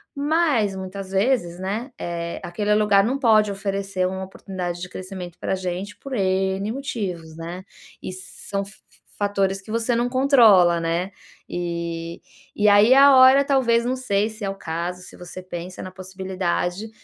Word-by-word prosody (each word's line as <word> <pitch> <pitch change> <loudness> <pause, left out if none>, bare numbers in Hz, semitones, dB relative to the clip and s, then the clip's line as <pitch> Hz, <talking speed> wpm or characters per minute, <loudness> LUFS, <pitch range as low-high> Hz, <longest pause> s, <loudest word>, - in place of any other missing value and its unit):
Mas, 285 - +1
muitas 190 0 -7
vezes, 195 -4 +1
né, 210 +8 -4
eh, 170 0 -4
aquele 205 +4 -1
lugar 210 -2 +4
não 260 +4 -1
pode 215 -5 +4
oferecer 195 -1 -2
uma 190 +1 -4
oportunidade 180 -2 -6
de 180 - -6
crescimento 185 -2 -8
pra - - -2
gente 185 +2 -4
por 275 -1 -8
N 190 +1 0
motivos, 185 - -5
né. 170 +3 -7 0.4
E - - -5
são 195 +2 -6
f 200 - -12
f - - -23 0.4
fatores 195 -1 0
que 190 - -17
você 230 +1 0
não 240 +1 0
controla, 230 -10 +5
né, 170 +3 -1 0.4
e 170 -1 -4 0.4
e 210 0 +2
aí 205 +4 +6
é - - +5
a 280 0 +8
hora, 260 +2 +7
talvez, 240 -4 +2
não 255 +1 0
sei 210 -5 0
se 220 0 -10
é 195 - -1
o 195 - -4
caso, 175 0 -4
se - - -13
você 180 +1 -10
pensa 180 0 -7
na 185 - -7
possibilidade 185 +1 -3
195 Hz, 170 wpm, -23 LUFS, 180-220 Hz, 0.4 s, a